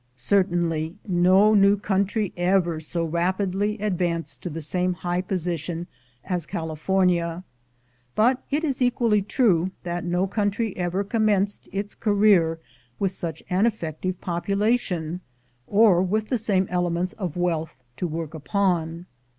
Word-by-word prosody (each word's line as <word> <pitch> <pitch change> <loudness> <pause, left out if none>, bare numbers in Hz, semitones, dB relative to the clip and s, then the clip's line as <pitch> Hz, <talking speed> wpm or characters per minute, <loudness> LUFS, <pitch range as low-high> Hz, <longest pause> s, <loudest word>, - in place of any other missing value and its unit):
Certainly 170 -2 +1
no 185 +3 +5
new 200 0 +5
country 200 0 0
ever 175 -2 +1
so 165 +2 -2
rapidly 190 +5 0
advanced 180 -5 -2
to 180 - -4
the 165 +1 -5
same 180 +3 -1
high 175 +1 -1
position 175 -2 -3 0.4
as 180 -4 -2
California; 170 +1 0 0.7
but 250 +4 +3
it 295 +3 0
is 275 -4 -1
equally 235 -4 +3
true 195 -5 +2 0.2
that 175 0 -3
no 180 +1 0
country 205 +1 -1
ever 180 +2 -1
commenced 205 -2 0
its 200 +1 -3
career 200 -6 +3 0.4
with 195 -2 0
such 165 -4 -5
an 190 +5 +2
effective 185 -3 -3
population, 180 -2 -1 0.5
or 205 -4 +5
with 210 +4 -1
the 250 - +1
same 200 -3 +2
elements 175 0 0
of 185 -6 -5
wealth 165 -2 -1 0.2
to 180 - -1
work 160 -1 -5
upon. 165 +1 -1
185 Hz, 130 wpm, -24 LUFS, 170-205 Hz, 0.7 s, no